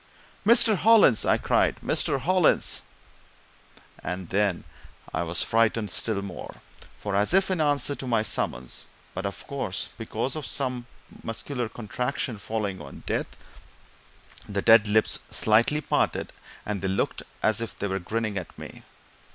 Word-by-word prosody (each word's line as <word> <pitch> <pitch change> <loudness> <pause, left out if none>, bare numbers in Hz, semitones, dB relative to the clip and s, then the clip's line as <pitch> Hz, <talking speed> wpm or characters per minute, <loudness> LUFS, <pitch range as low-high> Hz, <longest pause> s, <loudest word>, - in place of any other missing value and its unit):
"Mr. 225 -2 +6
Hollins!" 210 - +5
I - - +4
cried. - - +2
"Mr. 135 - +1
Hollins!" 185 0 +3 1.2
And 90 0 -4
then 100 -2 +1 0.5
I 80 - 0
was 85 0 +1
frightened 115 -1 +1
still 105 -3 -1
more, 95 -3 -8 0.4
for, 100 -1 -3
as 105 - +4
if 195 0 +3
in 180 -4 +1
answer 145 -2 +3
to 135 - -7
my 115 -3 +2
summons, 65 - -2 0.3
but, 95 +2 -3
of 100 - -8
course, 130 -9 -4
because 115 +4 -3
of 155 -3 -4
some 125 -3 -2 0.3
muscular 115 +1 -4
contraction 125 +1 -3
following 100 -4 -3
on 70 -2 -11
death, - - -2 1.1
the 100 -1 -2
dead 110 -1 +7
lips 110 +1 +2
slightly 115 +8 +3
parted, - - 0 0.3
and 105 -3 -3
they 95 - -1
looked 95 +1 -1 0.2
as 110 +1 +3
if 115 - -5
they - - -3
were 95 -1 -1
grinning 105 +2 -2
at 90 - -11
me. - - -10
110 Hz, 145 wpm, -26 LUFS, 100-130 Hz, 1.2 s, dead